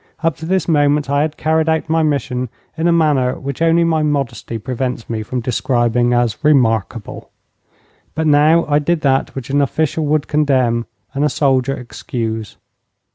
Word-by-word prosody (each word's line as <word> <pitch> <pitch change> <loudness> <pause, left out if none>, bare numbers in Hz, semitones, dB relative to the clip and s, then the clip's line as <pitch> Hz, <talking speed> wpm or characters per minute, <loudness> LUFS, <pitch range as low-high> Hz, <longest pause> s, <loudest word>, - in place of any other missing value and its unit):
Up 165 -3 +1
to 160 - -7
this 190 -1 0
moment 145 -2 +2
I 140 0 +2
had 155 0 -2
carried 160 0 +1
out 160 0 0
my 160 +1 +1
mission 135 -5 -1 0.3
in 165 +1 0
a - - +4
manner 150 -6 +2
which 140 +2 -6
only 165 +1 +4
my 160 -2 +1
modesty 140 -6 -2
prevents 125 +1 -4
me 110 -2 -3
from 125 +4 -4
describing 120 0 +1
as 120 +2 0
remarkable. 115 -7 +1 0.9
But 160 +1 -1
now 155 +3 +4
I 145 0 +2
did 160 +2 0
that 135 -1 +1
which 135 -1 -6
an 145 +1 +2
official 155 +3 -1
would 150 0 +1
condemn 130 -6 +1 0.3
and 140 +1 -1
a 150 - +3
soldier 135 -1 +1
excuse. 115 -3 -5
140 Hz, 170 wpm, -17 LUFS, 125-155 Hz, 0.9 s, a